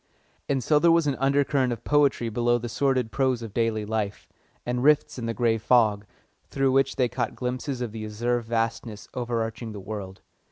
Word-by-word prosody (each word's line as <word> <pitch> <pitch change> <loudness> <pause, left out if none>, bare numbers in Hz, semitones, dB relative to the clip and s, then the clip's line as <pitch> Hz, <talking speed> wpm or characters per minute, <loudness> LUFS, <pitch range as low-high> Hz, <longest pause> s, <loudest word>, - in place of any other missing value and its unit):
And 135 -3 0
so 150 +3 +3
there 170 +2 +5
was 165 -1 +4
an 145 - +1
undercurrent 135 -1 +2
of 120 - -5
poetry 140 -5 +2
below 120 +2 +1
the 120 0 -5
sordid 130 -1 0
prose 130 -1 0
of 110 -3 -8
daily 115 -2 0
life, 105 -1 -3 0.4
and 125 0 -1
rifts 150 -2 +3
in 115 - -4
the 115 - -1
grey 115 -2 +1
fog, 105 -3 +3 0.4
through 135 -1 +1
which 135 0 +2
they 125 - +2
caught 125 +1 -3
glimpses 125 +1 -3
of 120 -3 -3
the 110 0 -6
azure 120 +3 -1
vastness 115 -1 -3
overarching 115 -2 -3
the 105 - -7
world. 95 -1 -7
120 Hz, 190 wpm, -26 LUFS, 110-135 Hz, 0.4 s, there